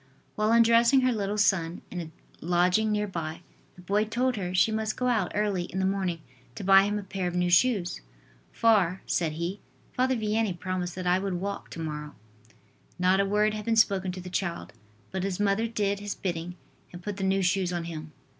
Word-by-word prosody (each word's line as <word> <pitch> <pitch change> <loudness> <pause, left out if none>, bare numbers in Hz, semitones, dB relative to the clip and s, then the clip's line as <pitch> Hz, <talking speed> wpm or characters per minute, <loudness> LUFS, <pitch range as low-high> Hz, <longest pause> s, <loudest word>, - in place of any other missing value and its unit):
While 215 +1 +1
undressing 235 +3 +5
her 255 0 +3
little 205 -2 -2
son, 180 -5 +1
in 180 - -4
a 160 - -7 0.3
lodging 180 +5 +2
near 210 0 +1
by, 165 -4 -5 0.3
the 180 - -14
boy 205 +4 +1
told 245 +4 0
her 180 -4 -3
she 185 +4 +3
must 220 0 -2
go 250 - -1
out 240 -3 +1
early 205 -4 0
in 185 - -7
the 190 - +1
morning 190 -4 -1 0.3
to - - -6
buy 195 +1 +7
him 205 +1 -1
a 205 - -4
pair 190 -1 -3
of 175 - -4
new 180 0 +1
shoes. 185 - +2 0.5
"For," 195 -5 +2
said 165 -3 0
he, 170 +5 -4 0.3
"Father 260 +1 +1
Vianney 215 -4 0
promised 180 -1 -3
that 185 0 -5
I 180 +1 +3
would 195 -1 -2
walk 200 +3 -4
to - - -8
morrow." 150 -2 -5 0.8
Not 185 +2 +3
a 195 - +2
word 210 +1 +2
had 215 0 -5
been 230 -1 +1
spoken 195 -4 +3
to 185 - -7
the 180 0 -9
child, 175 -3 -3 0.4
but 190 - -2
his 195 -1 -2
mother 205 +2 +1
did 205 -3 -1
his 205 0 -4
bidding, 175 -2 -4 0.4
and 175 0 -10
put 205 0 -4
the 195 - -3
new 190 0 +2
shoes 180 0 +1
on 175 -1 -2
him. 155 -2 -7
195 Hz, 210 wpm, -27 LUFS, 180-210 Hz, 0.8 s, buy